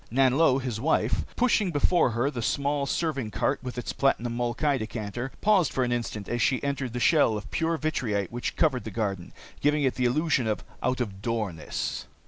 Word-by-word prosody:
Nanlo, 135 +2 +4
his 125 -5 -3
wife, 160 +4 +1
pushing 230 -5 +2
before 165 -1 +3
her 120 +5 0
the 120 - -4
small 140 +3 0
serving 140 -7 -1
cart - - 0
with 125 -1 -6
its 125 - -3
platinum 120 -3 +1
molkai 120 +4 0
decanter, 115 +3 -4
paused 200 -7 +4
for 130 - 0
an 120 - -1
instant 115 -4 -3
as 120 0 -1
she 130 +4 +2
entered 140 -4 -2
the 125 - -2
shell 120 -4 +4
of 105 - -9
pure 165 0 0
vitrite 115 - -1
which 120 +1 -3
covered 135 -8 +2
the 110 - -5
garden, 100 -5 -3 0.3
giving 150 0 +2
it 130 - +2
the 125 - -1
illusion 140 -1 +2
of 110 - -1 0.2
out 125 0 0
of 100 -5 -4
doorness. 105 -8 -3
125 Hz, 190 wpm, -27 LUFS, 115-145 Hz, 0.3 s, Nanlo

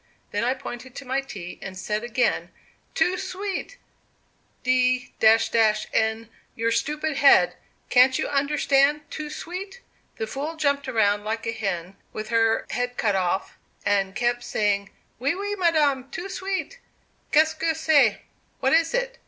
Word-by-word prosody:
Then 205 +2 -1
I 250 +2 +1
pointed 255 -1 -8
to 280 - -8
my 265 +2 0
tea, 190 -9 -9
and 190 -1 -7
said 210 +3 -2
again, 240 +1 0 0.5
'Too 365 0 +2
sweet, 390 +5 -4 0.9
d 255 0 +2
n 220 0 +3 0.3
your 230 0 0
stupid 300 +4 -1
head, 280 0 +6 0.4
can't 260 +1 +6
you - - -1
understand 280 0 +2
too 305 -1 -5
sweet?' 385 +8 -7 0.4
The 220 - -2
fool 285 +8 -4
jumped 280 -3 0
around 205 -4 +2
like 225 +1 -3
a 225 - -1
hen 195 -4 -4 0.2
with 215 0 -5
her 225 -1 +2
head 245 0 -2
cut 205 -4 +1
off, 190 0 -1 0.3
and 195 -1 +1
kept 240 0 0
saying, 200 -1 0 0.3
'Oui, 280 +6 0
oui, 410 +2 -3
madame, 300 -8 +2
too 370 +6 -6
sweet, 385 +6 -4 0.5
qu'est 315 0 +5
ceque 320 0 -1
c'est? 295 -9 +3 0.4
(What 265 0 +2
is 330 +6 +3
it?) - - -2
255 Hz, 145 wpm, -24 LUFS, 220-310 Hz, 0.9 s, head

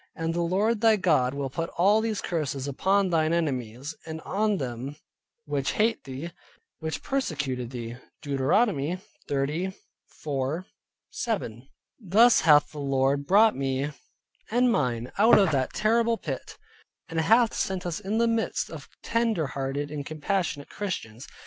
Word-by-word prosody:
And 165 0 -2
the 170 - 0
Lord 205 +6 +1
thy 225 -1 +6
God 150 -9 +2
will 140 -2 -3
put 165 +3 -3
all 200 +5 +4
these 220 -2 -2
curses 145 -5 -2
upon 190 +7 +1
thine 160 -1 +2
enemies, 135 -4 -2
and 160 0 -5
on 210 +3 0
them 130 0 -5 0.5
which 145 -1 -1
hate 225 -2 +1
thee, 135 +5 -6 0.5
which 160 -1 -4
persecuted 145 - -2
thee" 120 -1 -6 0.3
(Deuteronomy 145 - +1 0.3
30.4 150 0 -3 0.5
7). 135 - -3 0.3
Thus 225 +4 +5
hath 150 -2 +5
the 150 - -8
Lord 140 0 +1
brought 215 +3 +5
me 135 +1 -1 0.6
and 245 +2 +3
mine 125 - -1
out 225 +3 +7
of 195 -5 +4
that 130 -3 -1
horrible 230 +2 +2
pit, - - -6 0.5
and 165 -1 -1
hath 225 +6 +4
set 190 -2 -2
us 175 0 -2
in 210 +2 -2
the 235 0 +3
midst 230 -1 -1
of - - -9
tender 230 -8 +1
hearted 140 +1 -3
and 150 -1 -4
compassionate 155 -1 -2
Christians. 135 - -5
160 Hz, 145 wpm, -27 LUFS, 135-205 Hz, 0.6 s, out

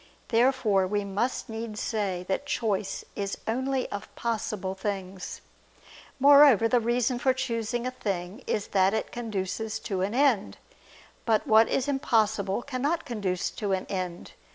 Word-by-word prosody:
Therefore 230 -6 +3
we 205 +1 -1
must 205 +8 -2
needs 225 -2 -5
say 195 -5 -2
that 235 +9 -2
choice 210 -7 -1
is 200 -1 -3
only 260 +3 0
of 205 - -5
possible 215 -4 -2
things. 190 -1 -5 0.8
Moreover, 280 -5 +7
the 245 +1 +3
reason 240 +1 0
for 260 +1 +3
choosing 240 -2 -2
a 255 - -1
thing 200 -3 -4
is 205 - -1
that 195 +1 +3
it - - -3
conduces 220 -2 -3
to 190 -3 -2
an 200 +4 -1
end. 255 -7 +2 0.7
But 220 -2 +2
what 220 +1 +5
is 265 - 0
impossible 220 -7 +1
cannot 285 +5 -1
conduce 200 -6 -2
to 205 -3 -2
an 190 - -1
end. 180 -2 -4
220 Hz, 145 wpm, -27 LUFS, 195-250 Hz, 0.8 s, Moreover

